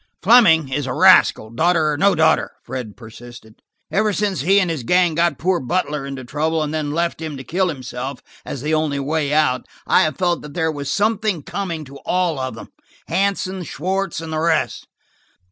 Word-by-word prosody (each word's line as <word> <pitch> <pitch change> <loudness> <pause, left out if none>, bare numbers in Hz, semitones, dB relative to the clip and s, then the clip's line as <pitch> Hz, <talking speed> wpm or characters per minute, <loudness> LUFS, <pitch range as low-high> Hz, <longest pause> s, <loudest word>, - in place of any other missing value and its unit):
"Fleming 180 - +6
is 135 +1 -2
a 125 - -2
rascal, 110 - +5
daughter 160 +4 +2
or - - -1
no 200 +7 +3
daughter," 160 0 +2
Fred 120 -6 -7
persisted. 115 -1 -13 0.3
"Ever 215 +1 +1
since 195 -6 -1
he 195 +7 +4
and 180 -4 0
his 155 -5 -3
gang 175 +7 +2
got 170 -3 +1
poor 180 +1 +1
Butler 150 -1 -2
into 135 -1 -6
trouble 155 +4 -1
and 150 0 -4
then 155 -2 -2
left 170 +2 -2
him 155 -3 -5
to 135 - -8
kill 185 +8 0
himself 130 -2 -6 0.2
as 135 -2 -6
the 155 +1 -1
only 155 -2 0
way 145 +1 -1
out, 150 -4 +1 0.2
I - - +4
have 155 - 0
felt 175 -2 0
that 150 -1 -11
there 160 -2 0
was 145 -2 -5
something 210 -5 0
coming 170 -5 -4
to 140 +1 -12
all 175 -4 -1
of 130 -3 -4
them–Hansen, 190 - -4
Schwartz 185 +4 -3
and 160 -1 -6
the 155 - -1
rest. 160 -1 0
155 Hz, 190 wpm, -20 LUFS, 140-180 Hz, 0.3 s, Fleming